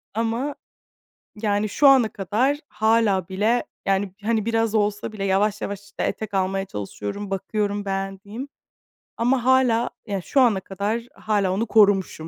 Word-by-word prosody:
Ama, 230 +6 -1 0.9
yani, 205 0 +1
şu 285 +5 +4
ana 260 -5 +6
kadar 235 +9 0
hâlâ 220 -4 +2
bile, 215 +6 +1 0.2
yani, 195 -1 0
hani, 220 -1 0
biraz 225 -1 +1
olsa 205 0 0
bile 210 -2 -5
yavaş 200 +2 +1
yavaş, 200 0 -4
işte, 200 - -6
etek 215 -2 -3
almaya 195 0 0
çalışıyorum, 105 - -6
bakıyorum 205 +1 -2
beğendiğim. 195 +5 -4 0.7
Ama 245 +1 +1
hâlâ, 255 -3 +3 0.2
yani, 195 -4 -3
şu 270 - +2
ana 220 -6 +4
kadar 200 +5 -3
hâlâ 205 -3 0
onu 215 +4 0
korumuşum. 195 -7 +3
205 Hz, 140 wpm, -23 LUFS, 195-230 Hz, 0.9 s, ana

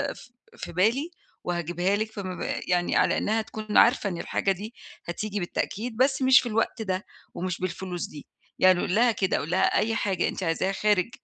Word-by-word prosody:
ف 245 0 -18
في - - -6
بالي 235 - +1 0.3
وهاجيبها 175 +2 0
لِك، 220 +1 -2
فما 185 -4 -5 0.2
يعني 175 -1 +1
على - - +3
إنها 220 +2 +1
تكون 215 -1 -3
عارفة 235 -4 +5
إن 175 - -4
الحاجة 195 - 0
دي 205 +5 -5 0.3
هتيجي 205 +4 -3
بالتأكيد، 220 +6 -3
بس 265 +1 +2
مش 260 0 +7
في 240 - -4
الوقت 225 +1 0
ده، 190 -1 -2 0.3
ومش 180 -1 -3
بالفلوس 180 0 -3
دي، 145 - -11 0.3
يعني 185 -1 +5
قُل 180 - 0
لها 240 +1 +5
كده، 195 -4 0
قُل 155 - -5
لها 185 - +2 0.2
أي 225 0 +1
حاجة 190 -3 0
أنتِ - - -4
عايزاها 170 +3 0
خارج 210 +1 +1
200 Hz, 185 wpm, -26 LUFS, 180-225 Hz, 0.3 s, مش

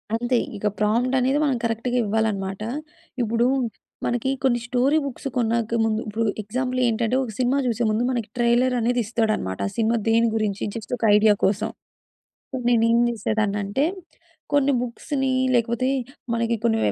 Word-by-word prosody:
అంతే. 240 +2 +1 0.2
ఇక 210 - -1
ప్రాంప్ట్ 235 +5 +2
అనేది 260 +3 +2
మనం 275 -4 +1
కరెక్ట్‌గా 230 +2 -1
ఇవ్వాలన్నమాట. 200 -2 -1 0.6
ఇప్పుడు 230 +1 +1 0.6
మనకి 240 +2 0
కొన్ని 245 -3 +3
స్టోరీ 255 +5 +2
బుక్స్ 275 +1 -5
కొన్నాక 230 -1 +1
ముందు 220 0 0
ఇప్పుడు 215 +2 -1 0.2
ఎగ్జాంపుల్ 255 +4 -2
ఏంటంటే 230 +1 0
ఒక 240 - -5
సినిమా 255 +2 +2
చూసే 240 -1 0
ముందు 215 +2 +1
మనకి 235 -4 -2
ట్రైలర్ 240 +1 +3
అనేది 245 +2 +1
ఇస్తాడు 225 0 0
అన్నమాట 95 0 -4
ఆ - - -6
సినిమా 230 +1 +2
దేని 230 +1 +4
గురించి 210 -2 -1
జస్ట్ 225 +1 -6
ఒక - - -9
ఐడియా 210 0 +5
కోసం. 210 +3 +1 0.8
అప్పుడు 255 -2 -4
నేను 230 -2 +4
ఏం 235 - +4
చేసేదాన్ని 215 -2 -1
అంటే, 205 +8 0 0.7
కొన్ని 285 -1 +3
బుక్స్‌ని 265 +2 -2 0.2
లేకపోతే 235 +1 +1 0.5
మనకి 230 0 0
కొన్ని 225 -1 +3
235 Hz, 155 wpm, -23 LUFS, 220-250 Hz, 0.8 s, ఐడియా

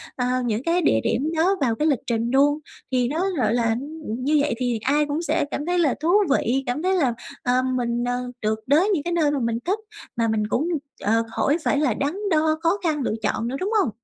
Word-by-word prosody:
ờ, 250 - -1 0.2
những 225 +1 -1
cái 340 +3 +1
địa 110 - +3
điểm 290 +6 0
đó 365 +5 +3
vào 240 -4 +2
cái 300 +6 0
lịch 280 -6 +2
trình 235 0 0
luôn. 290 +3 +3 0.3
Thì 250 -2 +2
nó 330 +8 0
gọi 230 -4 +1
là, 230 -2 +1 0.3
như 255 +7 0
vậy 290 -3 0
thì 245 -2 -1
ai 295 +3 +2
cũng 295 +2 -2
sẽ 315 -2 0
cảm 290 - -3
thấy 355 +1 +1
là 300 -6 +3
thú 315 +3 -1 0.2
vị, 270 -1 +1
cảm 245 +5 -2
thấy 375 +1 +2
là, 275 -9 +2 0.3
ờ, 250 0 +2
mình, 240 -1 -1
ờ, 245 0 -2
được 215 0 0
đới 315 +9 +4
những 355 -8 +1
cái 345 - -2
nơi 315 -4 +2
mà 290 - -1
mình 230 -1 -1
thích, 390 +5 0 0.4
mà 230 -1 +1
mình 215 -1 0
cũng, 270 +9 0 0.3
ờ, 225 +3 +2
khỏi 290 +3 +2
phải 285 - +1
là 285 -6 +2
đắn 280 +7 -1 0.2
đo, 315 0 +2
khó 335 +4 +3
khăn 310 -4 0
lựa 245 - -1
chọn 230 - -1
nữa, 255 - -3
đúng 395 +4 -2
hông? 275 - 0
275 Hz, 240 wpm, -23 LUFS, 240-315 Hz, 0.4 s, đới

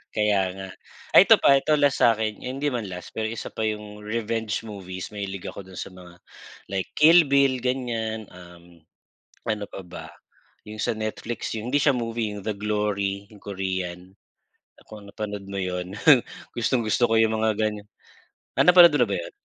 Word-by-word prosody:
Kaya 105 -2 +2 0.2
nga, 95 0 -7 0.5
ay - - +11
ito - - +7
pa, 140 - +6
ito 140 +3 +2
last 145 -2 +2
sa'kin, 110 -2 +2
hindi 135 +3 -3
man 120 -7 -2
last, 90 -1 -9
pero 110 0 -1
isa 115 - -6
pa 110 - -3
yung 105 -1 -4
revenge 110 0 -2
movies. 95 -3 -7
Mahilig 100 -2 -5
ako 100 - -7
dun 95 -1 -10
sa - - -5
mga, 90 -1 -14 0.5
like 95 -1 -3
Kill 165 +3 +8
Bill, 140 -2 +3
ganiyan, 115 -4 -2
um, 85 -2 -16 0.6
ano 105 -2 -1
pa - - -8
ba, 90 0 -9 0.6
yung 105 0 -10
sa - - 0
Netflix, 110 +2 -4
yung 110 +2 -4
hindi 145 +1 +2
siya 140 -2 +3
movie, 115 -3 -3
The 105 +1 -4
Glory, 100 -1 -2
yung 105 - -16
korean. 95 -2 -4 0.7
Kung 105 -2 -11
napanood 105 -2 -6
mo 100 - -3
yun, 90 0 -4 0.6
gustong-gusto 120 0 +1
ko - - +4
yung 110 0 +3
mga 110 0 +1
ganiyan. 105 -1 -2 0.7
Ah, - - +5
napanood 180 -1 +8
mo - - +1
na - - -12
ba - - +1
yun? - - -7
105 Hz, 175 wpm, -24 LUFS, 95-115 Hz, 0.7 s, ay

